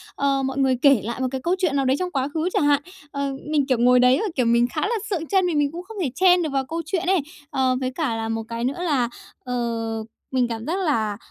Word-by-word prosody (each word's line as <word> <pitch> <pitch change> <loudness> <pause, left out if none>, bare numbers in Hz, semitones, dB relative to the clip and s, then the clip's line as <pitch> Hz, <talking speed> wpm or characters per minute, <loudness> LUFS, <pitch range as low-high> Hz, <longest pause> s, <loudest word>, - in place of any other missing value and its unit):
ờ, 275 -1 +1
mọi 265 0 -2
người 265 -2 +3
kể 275 -6 +5
lại 235 +2 -4
một 260 - +1
cái 265 - -3
câu 355 +2 +2
chuyện 355 -7 0
nào 275 -1 +1
đấy 260 +1 +2
trong 365 -1 -2
quá 270 -1 0
khứ 325 +3 0
chả - - +2
hạn. 290 -1 +3 0.3
Ờ, 280 -1 -2 0.2
mình, 295 -3 +2
kiểu, 255 -3 +2
ngồi 250 +1 +5
đấy 250 +1 +5
rồi, 430 0 -1
kiểu, 250 -3 +1
mình 235 +1 +3
khá - - 0
là 460 +3 0
sượng 335 -5 -2
trân, 380 -2 +2
vì 335 - -1
mình 290 -1 +2
cũng 350 +2 -7
không 440 +3 -11
thể 290 - 0
chen 365 -1 +5
được 310 - -1
vào 270 -1 0
câu 330 +4 -3
chuyện 350 +2 -1
ấy. 380 -1 +4 0.3
Ờ, 260 -1 +1
với 255 -1 -2
cả 270 -5 -2
là 225 0 -3
một 225 0 -2
cái 230 0 -4
nữa 275 +8 -2
là, 265 -8 +1 0.3
ờ, 230 -3 -2 0.3
mình 255 -2 +2
cảm 230 0 -5
giác 345 +4 -1
là 220 -9 0
270 Hz, 275 wpm, -23 LUFS, 245-325 Hz, 0.3 s, kể